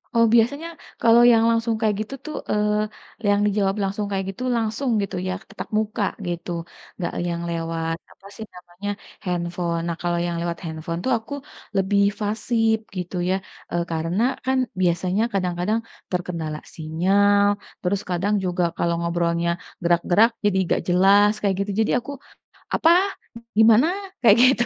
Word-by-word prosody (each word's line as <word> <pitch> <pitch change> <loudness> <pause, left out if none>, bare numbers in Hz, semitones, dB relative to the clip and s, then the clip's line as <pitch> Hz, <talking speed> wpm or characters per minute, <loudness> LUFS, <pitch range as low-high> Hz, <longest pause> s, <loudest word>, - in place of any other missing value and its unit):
Oh, 230 0 +6
biasanya 285 +8 +2 0.3
kalau 230 +1 +6
yang 225 -1 +5
langsung 230 0 +1
kayak 215 -2 +1
gitu 215 +5 -6
tuh 310 -1 -5
eee, 210 +1 -2
yang 205 0 +4
dijawab 200 -1 +1
langsung 200 +2 -2
kayak 195 -1 -1
gitu, 250 +6 -8
langsung 230 +4 -1
gitu 195 - -5
ya - - -1 0.2
tatap 200 - -7
muka 215 0 -1 0.2
gitu. 175 0 -4 0.4
Enggak 175 - -4
yang 170 -1 -2
lewat 165 -1 -2
apa - - -21
sih 220 - -7
namanya 180 +3 -8 0.4
handphone. 175 -1 -2
Nah, 170 - -2
kalau 175 0 0
yang 175 -1 -2
lewat 170 0 -2
handphone 165 +1 -4
tuh 260 - +1
aku 225 +5 -9 0.4
lebih 200 +1 +2 0.2
pasif, 220 +1 +1 0.2
gitu 180 +1 -4
ya. 190 - +3 0.4
Eee, 175 0 0
karena 165 +5 -1 0.2
kan 265 0 +2 0.2
biasanya 180 +3 +1
kadang-kadang 185 +3 0 0.3
terkendala 170 -4 -3 0.2
sinyal. 195 +6 +3 0.4
Terus 190 +2 0
kadang 185 +4 0
juga 180 -1 0 0.2
kalau 170 0 +1
ngobrolnya 170 0 0 0.3
gerak-gerak 175 +6 +4 0.2
jadi 200 -2 +3
enggak 175 - 0
jelas 195 +3 +5
kayak 195 -2 +2
gitu. 200 +1 -2
Jadi - - -1
aku, 265 +4 -8 0.6
"Apa? 325 - +4 0.7
Gimana?" 225 +4 +7 0.3
Kayak 225 -4 +7
gitu. 250 -2 +4
195 Hz, 150 wpm, -23 LUFS, 175-220 Hz, 0.7 s, Gimana